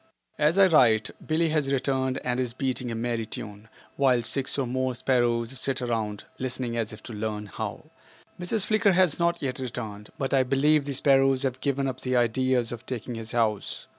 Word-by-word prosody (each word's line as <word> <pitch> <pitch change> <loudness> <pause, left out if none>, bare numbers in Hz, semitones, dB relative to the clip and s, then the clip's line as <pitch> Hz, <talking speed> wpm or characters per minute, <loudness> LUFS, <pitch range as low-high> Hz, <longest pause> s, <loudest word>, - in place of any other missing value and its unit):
As 155 +4 +3
I 195 - +8
write 120 -11 +4
Billie 160 +1 +1
has 150 -3 0
returned 130 -1 0
and 125 0 -1
is 125 -2 -1
beating 130 -1 -2
a 115 - -3
merry 115 -1 -2
tune, 105 0 -7 0.3
while 130 -3 +3
six 135 +4 +1
or 135 - 0
more 130 +1 -1
sparrows 120 -1 0
sit 135 -2 0
around 110 -4 -2 0.2
listening 125 -2 -3
as 115 -2 -2
if 110 0 -11
to 120 - -8
learn 105 0 -3
how. 100 - -6 0.5
Mrs. 190 +3 -1
Flicker 215 -2 +3
has 180 -4 +3
not 170 0 +1
yet 130 -1 -2
returned, 110 -5 -5
but 135 0 -2
I 135 - +5
believe 140 +3 +2
the 140 - -3
sparrows 135 0 +3
have 130 -1 -2
given 140 -1 0
up 130 -1 -4
the 130 0 -1
idea 125 +2 +2
of 120 -1 -2
taking 125 -1 -4
his 115 -1 -6
house. 110 -3 -1
130 Hz, 195 wpm, -26 LUFS, 115-140 Hz, 0.5 s, I